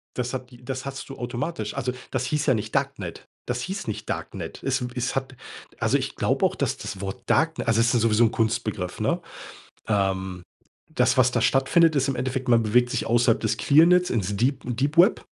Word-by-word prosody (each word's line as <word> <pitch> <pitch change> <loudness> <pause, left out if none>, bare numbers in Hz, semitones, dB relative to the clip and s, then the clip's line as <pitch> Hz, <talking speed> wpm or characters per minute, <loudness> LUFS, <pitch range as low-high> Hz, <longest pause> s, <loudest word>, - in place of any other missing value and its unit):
Das 125 0 -2
hat 130 -1 -6
die 120 -1 -16
das 130 +1 -4
hattest 135 0 -6
du 135 - -7
automatisch. 120 -2 -4
Also, 125 +1 -2 0.2
das 130 -1 -1
hieß 150 +3 -1
ja 130 - +4
nicht 110 -1 -4
Darknet. 135 -11 -3 0.2
Das 120 0 -2
hieß 190 +6 -5
nicht 110 0 -5
Darknet. - - -5
Es 135 0 0
w 125 0 -4
es 125 +1 -2
hat 135 0 -3 0.4
also, - - +2
ich - - -5
glaube - - +2
auch, - - -2
dass - - -1
das 95 - -6
Wort 95 0 -5
Darkne 160 0 +1
also 115 0 +3
es 115 0 +3
ist 120 - +3
sowieso 115 +1 +4
'n 115 - +3
Kunstbegriff, 110 -5 -2
ne? - - 0 0.7
Ähm, 95 -3 -1 0.5
das, - - +3
was 125 -1 +5
da 120 - +1
stattfindet, 155 +7 +3
ist 135 -1 +2
im 135 - -1
Endeffekt, 130 +1 -3
man 115 -1 +5
bewegt 120 +3 +3
sich 130 - -2
außerhalb 120 0 +3
des 110 -1 -1
Clearnets 175 +7 +5
ins 105 -3 -1
Deep 130 +4 +1
Deep 135 +6 -1
Web, 185 +6 +5
125 Hz, 210 wpm, -25 LUFS, 110-135 Hz, 0.7 s, was